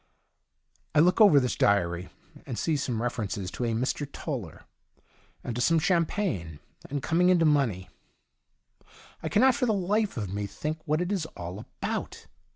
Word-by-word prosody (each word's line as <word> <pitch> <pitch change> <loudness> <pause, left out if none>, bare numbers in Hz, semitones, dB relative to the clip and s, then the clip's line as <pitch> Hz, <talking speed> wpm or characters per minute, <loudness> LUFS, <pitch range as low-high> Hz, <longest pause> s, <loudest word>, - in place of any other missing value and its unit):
I - - +6
look 180 +6 +4
over 195 -10 +8
this 125 -2 -1
diary, 90 -3 +1 0.4
and 120 - -4
see 160 - 0
some 125 -5 -2
refer 120 -3 -2
ences 95 -1 -4
to 125 - -3
a - - 0
Mr. 130 +5 -2
Toller, 120 - -6 0.8
and 120 - -4
to 120 - -1
some 165 +6 +4
champagne, 160 - 0 0.3
and 140 0 -3
coming 180 +3 +3
into 175 -3 +4
money. 125 - +1 1.3
I - - -3
cannot 255 +5 +5
for 250 0 0
the 220 - +3
life 200 - 0
of 100 -4 -3
me 100 0 -2
think 155 +9 -4
what 155 +3 +1
it 180 +2 -2
is 185 -6 -1
all 90 +3 -6
about. - - -5
145 Hz, 165 wpm, -27 LUFS, -, 1.3 s, over